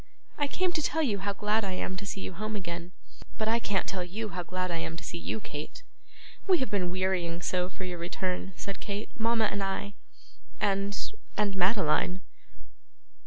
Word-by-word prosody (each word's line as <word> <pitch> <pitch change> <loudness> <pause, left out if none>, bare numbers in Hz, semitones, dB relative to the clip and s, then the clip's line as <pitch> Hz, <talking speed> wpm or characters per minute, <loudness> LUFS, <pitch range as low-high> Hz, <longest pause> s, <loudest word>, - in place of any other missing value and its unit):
'I 290 - +3
came 365 +5 +2
to 315 - +2
tell 320 +2 +2
you 210 -8 +2
how 200 +1 0
glad 210 +2 +2
I 190 -2 0
am 185 0 -1
to 200 +1 -4
see 195 - -2
you - - -4
home 215 +4 -2
again.' 175 -2 -3 0.5
'But 215 - +1
I 230 +1 +4
can't 205 -4 +1
tell 185 -2 -1
you 210 +5 -3
how 185 - -2
glad 185 +1 -1
I 170 - +1
am 165 0 -3
to 165 - -6
see 170 +1 -4
you, 220 - -1
Kate.' 150 -7 -6 0.6
'We 370 -2 +7
have 260 -9 -1
been 185 -4 +2
wearying 180 -2 +1
so 180 0 +2
for 190 - -7
your 180 -2 -3
return,' 180 +2 -1
said 200 +1 -4
Kate, 205 +1 -3
'mama 225 0 +4
and 200 - -1
I, 195 +1 -1 0.7
and 200 -1 +2 0.4
and 205 -2 +2
Madeline. 185 -1 +3
195 Hz, 195 wpm, -31 LUFS, 180-210 Hz, 0.7 s, We